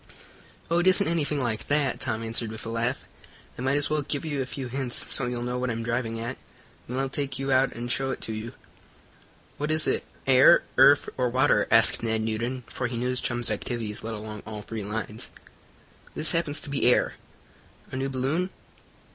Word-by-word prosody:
"Oh, 170 - +4
it 175 - +2
isn't 185 +2 +5
anything 155 -3 0
like 115 -4 -2
that," 145 -3 +1
Tom 110 +1 -1
answered 115 0 0
with 110 0 -7
a - - -3
laugh. 115 +2 -1 0.5
"I - - -7
might 135 +2 +2
as 145 - +4
well 155 0 +1
give 145 +2 -2
you 145 -3 -1
a 130 - -3
few 135 0 -5
hints, 125 0 -1
so 130 - 0
you'll 120 -1 -3
know 125 0 -2
what 125 0 -1
I'm 115 0 -2
driving 115 -1 -2
at. 120 +3 -4 0.5
Then 125 - -3
I'll 135 0 0
take 135 -1 -3
you 135 +1 -2
out 130 0 +4
and 120 +1 -4
show 135 +1 0
it 130 - -3
to 110 - -2
you." 110 +3 -6 1.1
"What 150 +1 -1
is 155 0 +2
it - - +1 0.2
air, 130 0 +7 0.2
earth 140 +2 +7
or 125 -1 +1
water?" 130 +4 +3
asked 115 0 +4
Ned 110 -1 0
Newton, 120 +4 -2
for 125 - -3
he 120 0 -4
knew 125 +2 -1
his 125 0 0
chum's 120 -2 +1
activities 110 0 -3
led 115 0 -4
along 105 0 -7
all 105 -1 -6
three 110 -1 -5
lines. 105 +1 -4 0.9
"This 155 - +4
happens 165 -3 0
to 150 - -3
be 135 -3 +1
air." - - +2 0.8
"A - - -5
new 135 +1 -1
balloon?" 135 +8 -1
125 Hz, 205 wpm, -26 LUFS, 115-140 Hz, 1.1 s, air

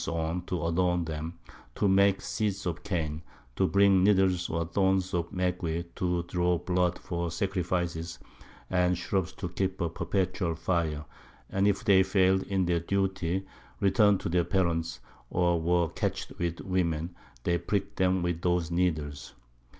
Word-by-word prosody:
_ 85 +2 -2
to 85 -3 -2
adorn 90 0 +1
them, 80 +2 -5 0.4
to 100 - +2
make 100 0 +4
Seats 100 -2 -2
of 90 -1 -2
Cane, 80 -5 -2 0.3
to 95 - +2
bring 100 -1 +4
Needles 95 -3 +3
or 85 0 -1
Thorns 95 +2 +1
of 85 -1 -1
Maguey 90 -3 -1
to 90 -1 0
draw 90 0 +1
Blood 90 0 0
for 85 -1 -3
Sacrifices, 85 -2 -2 0.5
and 90 -1 +2
Shrubs 95 0 -1
to - - -5
keep 95 +1 -2
a 85 -3 0
perpetual 90 -1 -1
Fire; 80 -3 -1 0.5
and 100 +1 +2
if 100 -1 +1
they 95 -2 +6
fail'd 95 0 +3
in 95 -2 +1
their 85 -1 +1
Duty, 95 0 -1 0.3
return'd 100 0 +4
to - - -3
their 90 0 +2
Parents, 85 -8 0 0.3
or 85 -2 +2
were 85 0 +2
catch'd - - -3
with 85 -1 -2
Women, 85 -3 -1 0.3
they 85 0 +1
prick'd 100 -1 -2
'em 95 -1 +2
with 85 -1 -1
those 90 -2 +1
Needles. 75 -7 -1
90 Hz, 150 wpm, -29 LUFS, 85-95 Hz, 0.5 s, they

